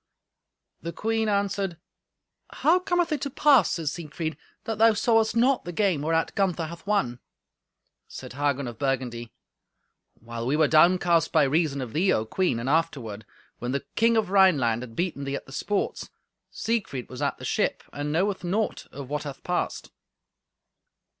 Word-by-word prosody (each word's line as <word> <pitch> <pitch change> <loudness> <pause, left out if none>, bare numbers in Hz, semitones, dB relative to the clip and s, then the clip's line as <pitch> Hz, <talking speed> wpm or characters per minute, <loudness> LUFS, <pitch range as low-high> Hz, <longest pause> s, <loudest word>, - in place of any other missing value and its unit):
The 170 - -4
queen 225 +3 0
answered, 200 -3 -1 0.8
"How 345 +4 +3
cometh 350 -2 0
it 295 -3 -1
to 280 - -2
pass, 275 - +4
Sir 165 -3 -4
Siegfried, 155 +1 -4 0.3
that 220 -1 -4
thou 225 0 +6
sawest 225 -1 +2
not 250 +3 +3
the 175 - -5
game 185 -5 +1
whereat 165 +2 0
Gunther 180 -4 0
hath 170 +4 -10
won?" 130 -13 0 0.9
Said - - -9
Hagen 140 -1 -1
of 120 -2 -8
Burgundy, 125 -4 -2 0.8
"While 115 +1 -6
we 140 - +2
were 155 -1 +4
downcast 170 +1 +4
by 155 - +4
reason 140 0 +1
of 120 -3 -6
thee, 180 +5 +2
O 110 - +1
Queen, 175 0 0
and 120 - -4
afterward, 135 -9 -1 0.3
when 120 +2 -3
the 140 - -2
king 230 +1 +3
of 210 -4 0
Rhineland 145 - +4
had 120 -3 -9
beaten 170 -6 -2
thee 140 0 -3
at - - -6
the - - -14
sports, 200 +8 -2 0.4
Siegfried 210 - -2
was 125 - -9
at - - 0
the - - -8
ship, - - 0
and 145 +1 -3
knoweth 190 +5 0
naught 205 +5 -1
of 140 -1 -8
what 150 +2 -2
hath 140 -3 -8
passed." - - -2
165 Hz, 165 wpm, -26 LUFS, 135-205 Hz, 0.9 s, thou